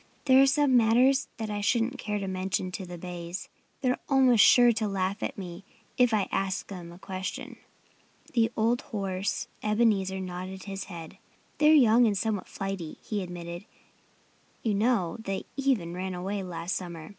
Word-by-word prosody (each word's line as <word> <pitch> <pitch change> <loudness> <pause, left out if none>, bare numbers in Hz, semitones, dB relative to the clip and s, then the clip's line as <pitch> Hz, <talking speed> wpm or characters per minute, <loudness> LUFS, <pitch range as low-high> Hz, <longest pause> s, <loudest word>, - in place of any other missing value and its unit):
There 265 -1 +7
are 275 - +6
some 280 -1 +3
matters 250 +4 +4
that 220 -1 -4
I 205 0 -2
shouldn't 235 +4 +1
care 210 -2 -2
to 200 -1 -3
mention 185 0 -2
to 185 0 -6
the 175 0 -7
bays. 175 +1 -6 0.3
They're 255 -2 +1
almost 260 -5 +6
sure 245 -1 +7
to 220 -1 -1
laugh 195 0 -2
at 275 - -3
me 180 -1 -7 0.3
if 245 -2 +4
I 210 -3 +1
ask 195 -1 -1
them 175 -4 -8
a 175 - -12
question." 185 0 -6 0.8
The 230 -2 +3
old 230 +2 +2
horse 195 -1 -3
Ebenezer 210 -3 +1
nodded 185 +1 -6
his 195 -1 -5
head. 165 -4 -9 0.4
"They're 305 +1 +6
young 240 -3 +6
and 205 -2 +1
somewhat 215 -2 -1
flighty," 195 -5 -5
he 210 -2 -2
admitted. 175 0 -7 1.0
"You 220 - +1
know, 205 -5 +1
they 195 -3 -4
even 255 -12 0
ran 185 +1 -4
away 195 +3 -3
last 175 0 -4
summer. 170 -4 -6
195 Hz, 170 wpm, -28 LUFS, 185-230 Hz, 1.0 s, There